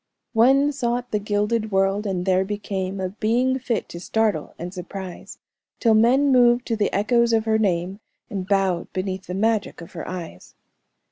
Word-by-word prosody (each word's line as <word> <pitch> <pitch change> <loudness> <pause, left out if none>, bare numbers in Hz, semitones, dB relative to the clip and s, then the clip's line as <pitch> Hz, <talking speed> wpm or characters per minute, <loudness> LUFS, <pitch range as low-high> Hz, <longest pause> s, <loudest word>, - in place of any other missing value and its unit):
"'One 270 +5 +4
sought 245 -3 -2
the 210 - +1
gilded 210 +2 -1
world, 195 +2 +1
and 180 -2 -2
there 190 0 +3
became 195 -1 -4
A 185 -1 -2
being 240 +6 0
fit 235 -3 -2
to 170 - -8
startle 210 -3 -1
and 175 +2 -6
surprise, 185 0 -8 0.4
Till 230 -2 +4
men 255 +6 +4
moved 245 -1 +4
to 230 - +1
the 210 -2 0
echoes 235 +3 +2
of 220 -1 +2
her 220 -1 +2
name, 185 -1 0 0.3
And 195 -5 -5
bowed 195 -4 0
beneath 185 0 -4
the 180 - -4
magic 220 +2 0
of 170 - -11
her 165 - -7
eyes.'" 170 - -8
205 Hz, 175 wpm, -23 LUFS, 190-235 Hz, 0.4 s, One